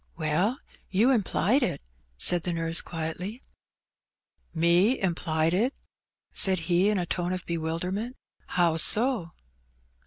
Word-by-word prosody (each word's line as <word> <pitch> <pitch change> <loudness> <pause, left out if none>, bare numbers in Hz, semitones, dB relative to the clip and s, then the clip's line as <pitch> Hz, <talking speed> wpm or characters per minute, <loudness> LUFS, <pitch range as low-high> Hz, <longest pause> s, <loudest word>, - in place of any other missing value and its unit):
WeD, 170 +9 0 0.3
you 215 +8 +3
implied 240 +2 +1
it/* 235 - -1 0.4
said 175 - +4
the 175 +1 -3
nurse, 165 0 0
quietly. 175 +8 -6 1.1
Me 175 +9 +3
implied 165 -3 0
it? 235 +9 0 0.6
said 190 -1 +3
he 175 +4 +2
in 210 - +1
a 180 - -1
tone 175 +1 -2
of 185 0 -4
bewilderment. 175 +8 -3 0.3
*'How 170 -2 +1
so? 215 -1 +3
180 Hz, 120 wpm, -27 LUFS, 165-210 Hz, 1.1 s, said